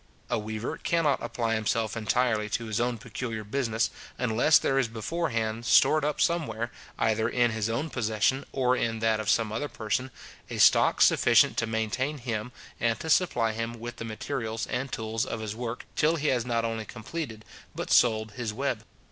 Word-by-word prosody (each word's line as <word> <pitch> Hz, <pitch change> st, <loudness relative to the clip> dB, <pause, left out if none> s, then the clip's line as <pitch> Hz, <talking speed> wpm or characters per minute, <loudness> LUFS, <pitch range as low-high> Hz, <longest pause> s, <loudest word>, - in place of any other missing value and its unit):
A -, -, +1 dB
weaver 110 Hz, +2 st, -4 dB
cannot 160 Hz, -5 st, +1 dB
apply 115 Hz, -1 st, -1 dB
himself 110 Hz, 0 st, 0 dB
entirely 110 Hz, -1 st, +1 dB
to 115 Hz, +2 st, -2 dB
his 110 Hz, +1 st, -1 dB, 0.2 s
peculiar 115 Hz, -1 st, -5 dB
business, 115 Hz, 0 st, -1 dB, 0.3 s
unless 125 Hz, +5 st, +4 dB
there 135 Hz, -, +1 dB
is 130 Hz, -, +2 dB
before 140 Hz, +10 st, -2 dB
hand 115 Hz, 0 st, -2 dB
stored 155 Hz, +5 st, +5 dB
up 150 Hz, 0 st, -1 dB
somewhere, 120 Hz, -9 st, 0 dB, 0.3 s
either 110 Hz, 0 st, +1 dB
in 120 Hz, -1 st, +2 dB
his 110 Hz, 0 st, -1 dB
own 140 Hz, +8 st, -2 dB
possession, 115 Hz, +3 st, +1 dB
or 125 Hz, -1 st, +2 dB
in 115 Hz, -2 st, -1 dB
that 110 Hz, -1 st, +1 dB
of 110 Hz, -, -2 dB
some 110 Hz, -2 st, +2 dB
other 115 Hz, +7 st, -2 dB
person, 110 Hz, +4 st, -2 dB, 0.4 s
a -, -, -5 dB
stock -, -, +5 dB
sufficient -, -, +5 dB
to 115 Hz, -, +1 dB
maintain 110 Hz, +6 st, -1 dB
him, 120 Hz, -2 st, -4 dB, 0.3 s
and 115 Hz, -1 st, +1 dB
to 160 Hz, -1 st, -2 dB
supply 120 Hz, -11 st, +3 dB
him 115 Hz, +1 st, -4 dB
with 120 Hz, +1 st, -7 dB
the -, -, -5 dB
materials 115 Hz, 0 st, -3 dB
and 130 Hz, +1 st, -3 dB
tools 110 Hz, 0 st, -2 dB
of 115 Hz, -, -4 dB
his 110 Hz, -1 st, -4 dB
work, 120 Hz, 0 st, -5 dB
till 155 Hz, +2 st, +3 dB
he 155 Hz, -2 st, 0 dB
has 125 Hz, -2 st, 0 dB
not 115 Hz, -1 st, 0 dB
only 115 Hz, -1 st, -3 dB
completed, 115 Hz, -1 st, -6 dB, 0.3 s
but -, -, -4 dB
sold 110 Hz, -2 st, +4 dB
his 120 Hz, -1 st, -4 dB
web. 125 Hz, -1 st, -2 dB
115 Hz, 180 wpm, -28 LUFS, 110-130 Hz, 0.4 s, stored